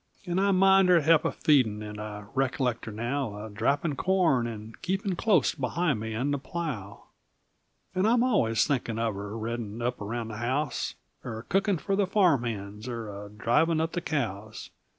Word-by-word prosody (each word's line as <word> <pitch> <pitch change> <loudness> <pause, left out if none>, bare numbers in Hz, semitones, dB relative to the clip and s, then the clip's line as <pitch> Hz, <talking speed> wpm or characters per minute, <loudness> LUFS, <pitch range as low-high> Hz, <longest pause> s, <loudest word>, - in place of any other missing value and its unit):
And 180 +1 0
I 200 - +3
mind 195 0 +5
her 175 -2 +6
he'p 160 +1 +4
a - - +2
feedin' 115 -8 +2
And 105 0 -7
I 105 -1 -6
recollect 130 -3 0
her 110 - -5
now 115 -1 -3
A 110 - -9
drappin' 140 +8 0
corn, 170 -9 +2
and 110 -1 -8
keepin' 195 0 -1
Clos't 185 - +3
behind 140 +1 0
me 110 0 -4
and 135 +6 0
the 140 - -1
plow! 135 - -5 0.9
And 185 +3 +2
I'm 235 +1 +4
allus 120 - +3
thinkin' 120 -5 -1
of 115 -1 0
her 100 +2 -6
Reddin' 115 -1 -4
up 125 0 -2
around 115 +2 -3
the 105 - -6
house; 130 +4 -1 0.3
Er 115 -2 -6
cookin' 195 0 +2
fer 195 +5 -1
the 200 -1 +2
farm 180 - +3
hands; 105 0 -5
Er 115 -3 -4 0.2
a - - -13
drivin' 120 +10 +2
up 160 +1 0
the 175 - -2
cows. 110 - -4
125 Hz, 185 wpm, -28 LUFS, 110-170 Hz, 0.9 s, her